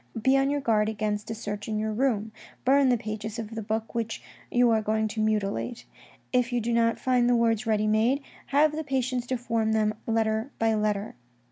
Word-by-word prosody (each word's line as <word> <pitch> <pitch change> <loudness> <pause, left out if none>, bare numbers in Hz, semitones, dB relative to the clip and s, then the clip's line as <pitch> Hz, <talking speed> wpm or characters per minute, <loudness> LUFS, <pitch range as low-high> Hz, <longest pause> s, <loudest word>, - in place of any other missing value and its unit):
Be 265 +4 +3
on 270 0 +3
your 290 0 0
guard 215 -4 +2
against 210 -1 -2
a 225 - -3
search 205 -2 -5
in 215 -1 -2
your 215 0 -1
room; 220 -3 0 0.3
burn 270 +1 +5
the 245 - +3
pages 215 0 -5
of 225 -1 -6
the 225 - -4
book 220 +1 -3
which 230 -1 -2 0.3
you 245 -1 +4
are 220 -1 +3
going 220 +1 0
to 215 +1 -3
mutilate. 215 +2 -1 0.5
If 250 -1 +2
you 245 - +1
do 235 +1 -1
not 230 -1 +2
find 245 0 +2
the 245 - +4
words 230 -1 +1
ready 215 -1 +2
made, 225 +6 +2 0.2
have 300 +2 +3
the 315 - -3
patience 255 -3 -1
to 255 - -1
form 225 -2 0
them 215 -1 +2
letter 220 +1 0
by 225 0 +2
letter. 210 -1 -1
225 Hz, 210 wpm, -27 LUFS, 215-245 Hz, 0.5 s, burn